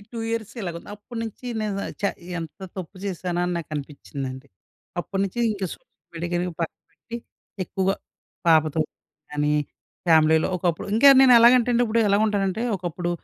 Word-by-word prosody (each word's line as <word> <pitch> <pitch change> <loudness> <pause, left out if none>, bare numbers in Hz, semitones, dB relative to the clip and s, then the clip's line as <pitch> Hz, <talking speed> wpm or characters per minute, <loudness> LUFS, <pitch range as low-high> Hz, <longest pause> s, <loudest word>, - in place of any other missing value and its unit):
2 230 - -5
years 225 -2 -3
ఇలాగుంది. 170 -2 -5
అప్పటినుంచి 230 +2 -7
నేను 200 -2 -2 0.2
చా! 200 - +3 0.3
ఎంత 165 +3 -7 0.2
తప్పు 185 +1 -7
చేశానని 180 -1 -1
నాకనిపించిందండి. 140 -3 -6 0.5
అప్పటి 195 +2 -3
నుంచి 195 +5 -5
ఇంక 200 -2 -4
సోషల్ - - -26 0.2
మీడియా 175 +1 -2
పక్కన 165 - -4
పెట్టి 235 0 -8 0.5
ఎక్కువగా 190 +2 0 0.5
పాపతో 155 -1 +4 0.5
కానీ, 150 0 +1 0.5
ఫ్యామిలీలో 160 -1 +5
ఒకప్పుడు 170 0 -1
ఇంక 230 - +2 0.2
నేను 260 -2 +8
ఎలాగంటే 240 +1 +6
ఇప్పుడు 230 +1 +1
ఎలాగుంటానంటే 205 0 +2
ఒకప్పుడు 175 0 -3
180 Hz, 125 wpm, -24 LUFS, 165-215 Hz, 0.5 s, నేను